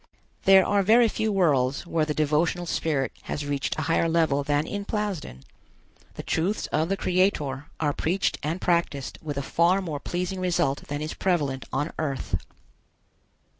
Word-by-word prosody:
There 190 -1 +7
are 205 0 +2
very 230 +4 +5
few 220 0 -1
worlds 145 -8 +2
where 165 -2 0
the 150 -1 -2
devotional 155 +4 +1
spirit 150 -5 -1 0.2
has 145 - -3
reached 145 -1 -2
a 155 - -1
higher 165 +2 +2
level 160 -4 +2
than 145 +1 +1
in 205 +3 -4
Plasden. 200 - -4 0.7
The - - -6
truths 185 +6 -1
of 160 +2 +1
the 195 - 0
Creator 160 -8 0
are 150 -2 +1
preached 180 +7 0
and 160 +5 -2
practised 170 -7 -1
with 145 -3 -5
a 140 - -1
far 170 +6 +3
more 160 -7 -4
pleasing 180 +4 -3
result 175 -6 0
than 145 +1 -3
is 155 - -4
prevalent 145 -8 -1
on 150 - -2
Earth. 140 -4 -2
160 Hz, 165 wpm, -26 LUFS, 145-185 Hz, 0.7 s, There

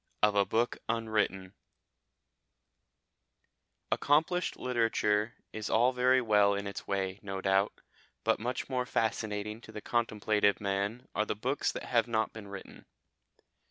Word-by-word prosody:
OF 105 0 +5
A 100 -1 +3
BOOK 115 +4 +1
UNWRITTEN 105 -5 0 2.4
Accomplished 160 +5 +2
literature 115 -3 +1 0.2
is 110 -1 -4
all 120 +3 +4
very 125 +1 +4
well 105 -2 +4
in 100 0 -3
its 100 0 -6
way, 95 -1 -1
no 95 -1 -4
doubt, 95 +1 +1 0.4
but - - +2
much 120 +3 -3
more 125 -1 -1
fascinating 110 -1 -1
to 110 - -12
the 105 - -6
contemplative 105 -3 +1
man 100 +4 -2
are 105 +1 0
the - - -1
books 130 +7 0
that - - -5
have 120 -1 +2
not 110 -1 0
been 110 -2 -9
written. 100 -1 -10
110 Hz, 135 wpm, -31 LUFS, 100-120 Hz, 2.4 s, OF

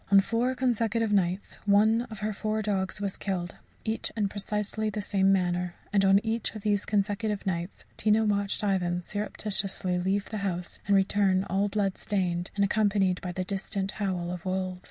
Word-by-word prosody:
On 200 0 +8
four 235 +6 +1
consecutive 230 -3 +1
nights 185 0 0
one 220 +4 +4
of 215 -2 -8
her 215 0 -1
four 215 +1 -1
dogs 195 -2 -1
was 200 -2 -3
killed, 180 -3 -3 0.3
each 220 +1 -2
in 205 -2 +1
precisely 210 +1 -1
the 210 - -4
same 195 -1 +2
manner; 180 -2 +1 0.2
and 200 -1 +4
on 195 0 +6
each 225 0 -1
of 215 - -7
these 205 -1 +1
consecutive 205 0 0
nights 175 -1 -3
Tina 220 +1 +3
watched 200 0 0
Ivan 180 -3 0
surreptitiously 195 -2 -2
leave 195 +2 0
the 215 - -2
house 180 -3 -3
and 200 - +4
return 195 -1 +3
all 195 +1 0
bloodstained, 195 -3 -1
and 200 -1 +3
accompanied 200 -3 +2
by 180 - -4
the 185 +1 -2
distant 195 0 -3
howl 180 -3 -1
of 180 -1 -5
wolves. 185 -1 -2
200 Hz, 175 wpm, -28 LUFS, 190-210 Hz, 0.3 s, On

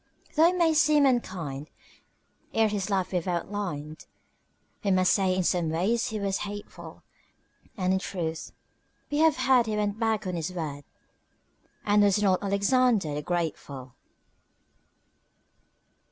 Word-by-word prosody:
Though 320 +1 +5
it 360 +1 0
may 335 -2 +3
seem 305 -2 +4
unkind, 170 - -1 0.9
ere 225 -1 +3
his 205 -1 -3
life 190 -3 0
we've 180 -1 -2
outlined, 175 -4 -4 0.8
We 200 - 0
must 185 -1 +3
say 190 -2 +2
in 185 - 0
some 175 -2 +1
ways 195 +10 0
he 220 -2 -4
was 195 -1 -1
hateful; 205 0 -8 0.7
And 185 -1 +1
in 190 - +1
truth, 165 -4 -4 0.6
we 290 - 0
have 320 0 +4
heard 260 -2 +3
he 215 -1 -1
went 210 0 -1
back 220 -2 0
on 185 - -3
his 170 +1 -3
word, 145 -5 -5 1.0
And 210 0 +4
was 205 0 +4
not 190 -3 +2
Alexander 200 - +2
the 150 - -3
Grateful. 145 -6 -4
195 Hz, 140 wpm, -27 LUFS, 175-220 Hz, 1.0 s, Though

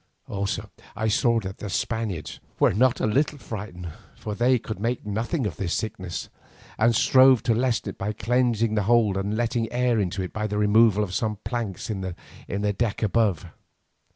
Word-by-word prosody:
Also 100 0 -3 0.2
I 110 - -1
saw 115 0 +3
that 95 -1 -7
the 105 - -5
Spaniards 100 -4 -3 0.2
were - - +4
not 125 +5 +3
a - - +1
little 140 +7 +1
frightened, 100 -8 -7 0.3
for 105 - -5
they 125 +4 +3
could 110 -3 -6
make 115 +2 -2
nothing 115 - -2
of 85 -7 -3
this 90 -4 -1
sickness, 95 -5 -4 0.5
and 115 +1 +4
strove 130 +1 +6
to 115 - +2
lessen 120 -2 0
it - - -9
by 105 +2 -1
cleansing 115 -1 +1
the 105 - +2
hold 115 -5 +4
and 100 +2 -1
letting 115 -1 -1
air 120 -2 +1
into 95 -1 -1
it 90 - -7
by 110 0 -2
the 105 0 -3
removal 105 0 +4
of 95 -3 -5
some 110 +1 -1
planks 115 -5 -3
in 100 -3 -3
the 100 +2 -4
deck 110 +1 -1
above. 105 -5 +1
110 Hz, 180 wpm, -25 LUFS, 100-120 Hz, 0.5 s, strove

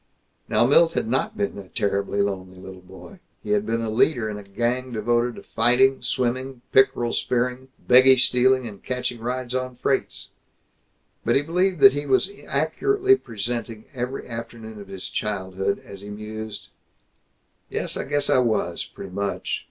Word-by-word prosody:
Now - - +4
Milt 165 +6 +5
had - - -1
not 135 - -1
been 200 - -2
a 95 - -10
terribly 100 -1 0
lonely 95 -2 -4
little 95 0 -10
boy. 95 - -13 0.2
He - - -4
had 210 0 +1
been 115 - 0
a 115 - -2
leader 115 -1 +2
in 105 - -5
a - - -10
gang 120 +6 -2
devoted 120 +2 0
to - - -11
fighting, 125 +4 +3
swimming, 130 0 -2
pickerel 120 -3 +3
spearing, 125 +1 -1 0.2
beggie 130 +1 +7
stealing, 125 +1 +3
and 100 -3 -10
catching 125 -1 -3
rides 125 +1 -3
on 130 -1 -2
freights. 135 +2 -2 0.9
But - - +2
he 140 - +3
believed 180 +1 0
that 135 -1 +9
he 145 0 -3
was 140 +9 +2 0.2
accurately 400 -1 +2
presenting 115 - -5
every 125 +1 -4
afternoon 115 -2 -8
of 100 - -11
his 95 -1 -7
childhood, 95 -1 -2
as 100 -1 -11
he 100 - -9
mused, 110 +1 -7 1.0
"Yes, - - -2
I - - -2
guess 145 0 0
I - - +4
was, 110 -8 0
pretty 95 - -10
much. 100 -1 -2
120 Hz, 165 wpm, -24 LUFS, 105-130 Hz, 1.0 s, that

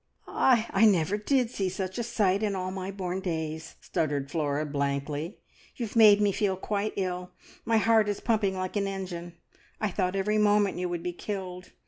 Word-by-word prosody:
"I 235 -4 +3
n 205 +3 +5
n 215 - +8
never 170 +2 0
did 245 +3 +1
see 195 -5 -1
such 190 +2 -4
a - - 0
sight 200 -4 +1
in 205 -2 0
all 185 0 -3
my 190 0 -5
born 185 -2 -3
days," 160 -3 -4
stuttered 145 -3 -2
Flora 150 -2 -1
blankly. 145 +4 -2 0.4
"You've 235 -3 -5
made 210 -2 +8
me 205 -1 +3
feel 195 -1 0
quite 205 +2 -2
ill. 180 -1 -3 0.3
My 225 -1 +3
heart 220 -1 +4
is 205 - -2
pumping 210 -5 +1
like 185 +1 -3
an 200 -1 0
engine. 180 -3 -5 0.4
I 215 -2 -1
thought 185 0 -1
every 210 +2 +1
moment 205 -2 +3
you 180 0 -1
would 175 -1 -4
be 180 0 -3
killed. 185 -1 -6
190 Hz, 190 wpm, -28 LUFS, 175-210 Hz, 0.4 s, n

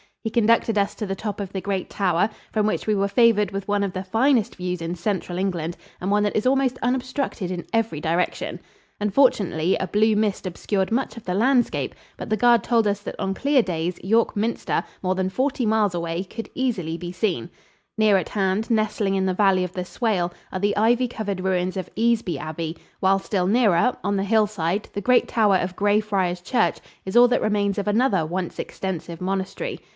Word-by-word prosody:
He 225 - -1
conducted 230 -1 +3
us 200 0 +1
to 215 - -4
the 195 - -2
top 210 +1 -5
of 195 -2 -5
the 190 - -4
great 195 -1 -3
tower, 190 +1 +1 0.2
from 215 -1 +1
which 215 - -1
we 215 - +2
were 200 -1 +1
favored 210 -2 +4
with 195 0 -5
one 205 0 +1
of 195 -2 -2
the 185 - -4
finest 230 +3 +2
views 180 -1 -3
in 165 +1 -3
Central 180 -1 -2
England 175 -3 -2 0.2
and 185 - -3
one 205 0 +3
that 205 - -1
is 215 - 0
almost 260 -1 +2
unobstructed 255 -5 -1
in 180 -1 -4
every 225 -9 0
direction. 170 +3 -1 0.4
Unfortunately, 200 - +2
a 190 - -2
blue 215 +2 +3
mist 210 -1 0
obscured 190 +2 -2
much 245 +1 -1
of 230 - -9
the 180 - -1
landscape, 245 +4 +1 0.2
but - - -7
the 215 - +1
guard 235 0 +4
told 230 -2 +2
us 200 0 0
that - - -6
on 195 - -1
clear 280 +2 +3
days 175 -1 -2
York 225 +5 +2
Minster, 220 +3 -1 0.2
more 185 0 0
than 185 0 0
forty 255 +3 -1
miles 210 -4 +2
away, 170 +1 -2
could 225 +4 -7
be 260 - -2
easily 175 -7 -2
seen. 180 -1 -1 0.5
Near 215 -2 +5
at 180 - -3
hand, 195 +2 0
nestling 215 -3 +1
in 190 -1 +1
the 185 - +1
valley 195 -2 +3
of 180 0 -5
the 180 -1 -4
Swale, 185 -4 -1 0.2
are 185 - -3
the 205 +1 0
ivy 240 +4 +3
covered 205 -5 -4
ruins 185 0 0
of 185 -1 -4
Easby 225 -4 +1
Abbey; 160 +1 -5 0.2
while 195 +1 +3
still 190 -2 -1
nearer, 220 0 +3
on 200 0 0
the 195 - 0
hillside, 205 -3 +1
the 205 - -3
great 250 +5 +3
tower 210 -4 +3
of 180 0 -3
Grey 205 +1 +3
Friars 190 -4 -1
Church 245 +7 +1 0.3
is 190 - -5
all 245 0 +8
that 245 - +1
remains 205 -1 0
of 205 - -3
another 210 -4 +2
once 180 +2 -4
extensive 175 -3 -5
monastery. 190 0 -3
200 Hz, 205 wpm, -23 LUFS, 185-220 Hz, 0.5 s, all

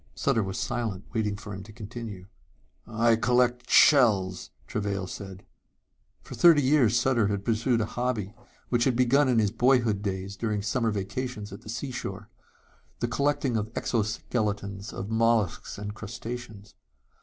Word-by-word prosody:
Sutter 135 -5 +1
was 95 -1 -4
silent, 115 -6 -3
waiting 105 -3 0
for 105 0 -8
him 95 - -6
to 105 +3 -12
continue. 110 -3 -8 0.6
"I 115 +1 +3
collect 125 +1 +1
shells," 100 - +4 0.2
Travail 100 -2 -2
said. 95 0 -9 0.8
For - - -10
thirty 165 -4 +6
years 130 -4 +4
Sutter 120 -6 +2
had 100 -1 -2
pursued 115 +1 +1
a - - 0
hobby 115 -4 -2 0.4
which 120 -1 +2
had 130 -3 +2
begun 130 +3 +4
in 125 - +3
his 105 -3 +3
boyhood 115 -3 +2
days 95 -1 -4
during 105 -2 -2
summer 115 +2 0
vacations 105 +1 -4
at 100 - -9
the - - -12
seashore 125 +2 -5 0.7
the 120 - -1
collecting 140 0 0
of 110 0 -2
exoskeletons 105 -2 -2
of 100 +3 -6
mollusks 115 -4 +1
and 105 0 -5
crustaceans. 110 -1 -8
110 Hz, 145 wpm, -27 LUFS, 100-120 Hz, 0.8 s, thirty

